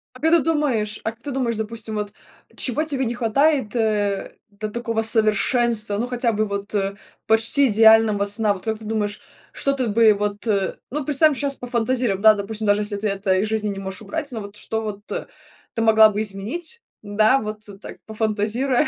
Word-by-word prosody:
А - - -12
как 320 +4 +1
ты 335 - +6
думаешь 255 -9 -1
а 220 - -2
как 225 +1 -23
ты 290 - -5
думаешь, 250 -3 -1
допустим, 220 0 -5
вот 210 -1 -4 0.4
чего 275 +4 -2
тебе 275 -4 -2
не 235 - -2
хватает, 250 +1 +1
э, 210 -3 -1
до 210 +1 -6
такого 230 0 -2
совершенства, 220 0 +2
ну 235 +4 -2
хотя 245 -2 -1
бы 215 +1 0
вот, 200 0 -5
э, 195 -1 -1 0.3
почти 225 +5 +3
идеального 220 -1 +5
сна? 205 0 +6
Вот 190 - -11
как 220 -1 -2
ты 220 - -11
думаешь, 210 -1 -3 0.3
что 275 - 0
тут 255 -5 -2
бы 225 -1 +5
вот, 205 +2 -4
э, 200 -3 0
ну, 295 +1 -4
представим 295 +1 +4
щас, 280 0 -1
пофантазируем, 240 -4 -1
да, 220 0 +7
допустим, 215 +1 -5
даже 205 +1 +3
если 205 0 -3
ты 210 +1 -2
это 195 -1 0
из 195 +3 0
жизни 215 -1 -2
не 195 -1 -5
можешь 190 0 -6
убрать. 220 +7 -5
Но 225 -3 -5
вот 200 0 -10
что 220 +1 -3
вот 210 -2 -6 0.7
ты 230 - -2
могла 220 -1 +6
бы 210 0 -3
изменить, 230 - -4 0.2
да, 215 +5 +2
вот 215 -2 -6 0.2
так, - - -10
пофантазируя, 220 +5 -1
220 Hz, 195 wpm, -21 LUFS, 210-245 Hz, 0.7 s, да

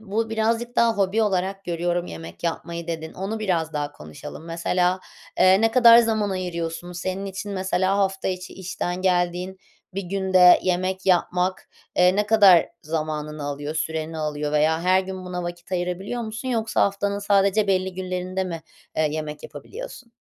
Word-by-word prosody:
bu 220 +2 -2
"birazcık 230 +2 -1
daha 235 -1 +4
hobi 200 +3 +2
olarak 195 -1 -1
görüyorum 175 0 -1
yemek 80 +1 -9
yapmayı" 170 0 -3
dedin. 160 -1 -5
Onu 195 +4 -4
biraz 170 -7 -1
daha 145 -1 -3
konuşalım. 75 - -10
Mesela, 180 +2 0 0.4
eee, 185 +2 +6
ne 225 0 +3
kadar 235 -1 +8
zaman 220 -3 +2
ayırıyorsun? 175 -2 -4
Senin 185 +2 -4
için, 195 +1 -5
mesela, 190 0 0
hafta 195 -1 0
içi 185 -1 -5
işten 185 -1 -4
geldiğin 180 0 0 0.4
bir 195 - -2
günde 185 -1 +5
yemek 185 +1 -1
yapmak, 180 0 +1 0.3
eee, 180 +1 +5
ne 210 0 +1
kadar 200 -5 +6 0.2
zamanını 155 -1 -3
alıyor? 145 +1 -4
Süreni 160 0 -3
alıyor 150 -1 -2
veya 155 +2 +2
her 185 +1 +4
gün 190 0 -7
buna 180 -1 -4
vakit 175 +1 -7
ayırabiliyor 185 +6 -2
musun 220 +3 -5
yoksa 225 -3 +1
haftanın 200 0 0
sadece 200 +1 +2
belli 190 -1 0
günlerinde 185 0 -3
mi, 165 -3 -5 0.4
ııı, 155 -1 +3
yemek 150 -1 -5
yapabiliyorsun? 440 - -9
185 Hz, 155 wpm, -24 LUFS, 170-200 Hz, 0.4 s, kadar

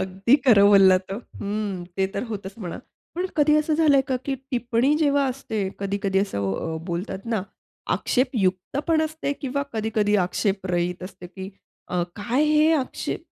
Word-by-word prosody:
अगदी 190 +7 +2
खरं 200 -4 +7
बोललात 190 -2 +6
हो - - -3
हं, 205 -5 -5
ते 190 0 +2
तर - - -1
होतंच, 195 -2 -6
म्हणा. 175 -5 -6 0.4
पण 360 +2 -1
कधी 300 0 +4
असं 305 0 +1
झालंय 300 -4 +5
का, 260 - +1
की 275 - -1 0.2
टिप्पणी 245 +3 +1
जेव्हा 285 -2 +3
असते, 245 -4 -4 0.2
कधी-कधी 200 -1 -1
असं 100 - -1
अ, 160 0 -3
बोलतात 180 +2 -3 0.2
ना, 195 - 0 0.5
आक्षेपयुक्त 220 -4 0
पण 315 -1 +3
असते 315 -2 -2
किंवा 280 0 -2
कधी-कधी 215 -1 +1
आक्षेपरहित 180 -3 -1
असते 185 -1 -9
की 190 +2 -8 0.4
अ, 180 -1 0
काय, 235 +8 0
हे 305 +1 +4
आक्षेप 270 -5 -2
210 Hz, 155 wpm, -24 LUFS, 190-275 Hz, 0.5 s, खरं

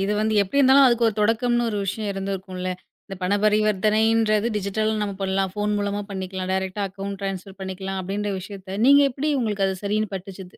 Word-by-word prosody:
இது 195 +2 0
வந்து, 215 +1 +1
எப்படி 200 +9 -2
இருந்தாலும் 270 0 +7
அதுக்கு 235 -2 +3
ஒரு 215 - -3
தொடக்கம்னு 240 +2 +2
ஒரு 210 -2 -2
விஷயம் 205 +2 -3
இருந்துருக்கும்ல. 190 -1 -4 0.4
இந்தப் 195 -2 -9
பண 190 +3 +2
பரிவர்த்தனைன்றது 215 +1 +2
டிஜிட்டல்னு 215 +2 -1
நம்ம 200 -1 -3
பண்ணலாம், 190 0 0
போன் 210 0 0
மூலமா 205 0 -2
பண்ணிக்கலாம், 190 -1 -4
டைரக்ட்டா 190 +1 -2
அக்கௌன்ட் 195 0 -6
ட்ரான்ஸ்பெர் 195 0 -5
பண்ணிக்கலாம், 190 0 -4
அப்படின்ற 200 +2 -3
விஷயத்த 195 0 -8
நீங்க 280 +1 +7
எப்படி 290 +4 -1
உங்களுக்கு 210 -4 0
அது 190 - -2
சரின்னு 210 0 -1
பட்டுச்சு 190 +1 -9
200 Hz, 175 wpm, -23 LUFS, 190-215 Hz, 0.4 s, இருந்தாலும்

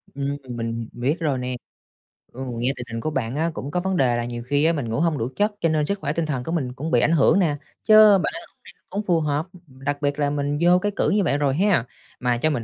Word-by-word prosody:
Ừm, 140 0 -2
mình 115 -1 -4
biết 135 +8 -1
rồi 150 -6 0
nè. 125 0 -3 0.8
Ừ, 130 - -9 0.2
nghe 125 +3 +1
tình 120 - -6
hình 115 - -3
của 155 - -1
bạn 125 -3 -2
á, 160 +2 0
cũng 140 +3 -6
có 180 - 0
vấn 190 0 -1
đề 125 -5 +2
là 120 - -2
nhiều 120 -1 -5
khi 145 +3 +2
á, 165 - +4
mình 130 -7 -3
ngủ 115 - -1
hông 165 -3 +1
đủ 115 - -1
chất 210 +1 +2
cho 165 - +2
nên 155 -1 +1
sức 200 +4 -2
khỏe 150 - -2
tinh 165 0 -1
thần 135 -5 -2
của 165 - -5
mình 130 -7 -2
cũng 155 +5 -5
bị 120 - +4
ảnh 160 - +3
hưởng 165 +4 +4
nè, 155 -6 +1 0.3
chớ 215 -2 +8
bạn - - 0 0.2
hông - - -38
đi - - -12 0.2
hông 205 +2 -2
phù 175 -4 +2
hợp, 150 +1 -1 0.2
đặc 140 +2 -4
biệt 145 0 -1
là 145 -1 +2
mình 145 0 -1
vô 175 +1 +5
cái 205 +2 -1
cữ - - +1
như 205 0 +2
vậy 145 -4 +1
rồi 140 -2 +1
ha. 190 - +2 0.3
Mà 125 -1 +1
cho 155 +6 +1
mình 130 -6 -2
145 Hz, 280 wpm, -23 LUFS, 125-165 Hz, 0.8 s, chớ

